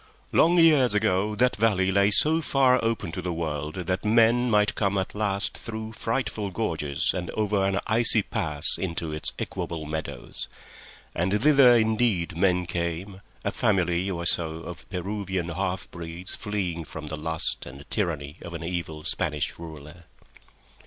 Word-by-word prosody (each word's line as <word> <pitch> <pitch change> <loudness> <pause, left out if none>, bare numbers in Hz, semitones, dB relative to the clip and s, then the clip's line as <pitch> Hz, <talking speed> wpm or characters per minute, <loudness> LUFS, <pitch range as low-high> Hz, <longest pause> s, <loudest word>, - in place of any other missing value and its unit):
Long 175 +2 +4
years 150 -9 +5
ago 105 0 +1
that 125 +3 +2
valley 100 -3 +2
lay 100 +1 +4
so 155 +9 +6
far 130 -4 +3
open 115 -6 -1
to 90 - -5
the 90 0 -3
world 80 -2 -3
that 90 0 -2
men 115 +3 +4
might 105 -1 +3
come 100 -1 0
at 95 - -2
last 100 -1 -2
through 110 -1 -6
frightful 115 -3 -2
gorges 80 -8 0
and 90 -2 -4
over 105 -2 +1
an 95 0 +1
icy 110 0 +3
pass 80 -10 0
into 85 -3 -3
its 75 - 0
equable 80 -2 -4
meadows, 80 +1 -5 0.7
and 95 +5 0
thither 135 -5 +7
indeed 110 -6 +1
men 90 0 +2
came, 90 +3 -4 0.2
a - - +1
family 90 -2 +1
or 85 -2 -3
so 80 -1 0
of 85 +1 -9
Peruvian 95 -1 -3
half 90 +1 -3
breeds 85 +2 -8
fleeing 95 -6 -3
from 80 0 -8
the 75 +1 -5
lust 80 -2 -2
and 70 +4 -11
tyranny 80 -7 -2
of 85 -1 -8
an 85 - -6
evil 85 -3 -4
Spanish 75 0 -2
ruler. 80 +1 -10
95 Hz, 155 wpm, -26 LUFS, 85-110 Hz, 0.7 s, thither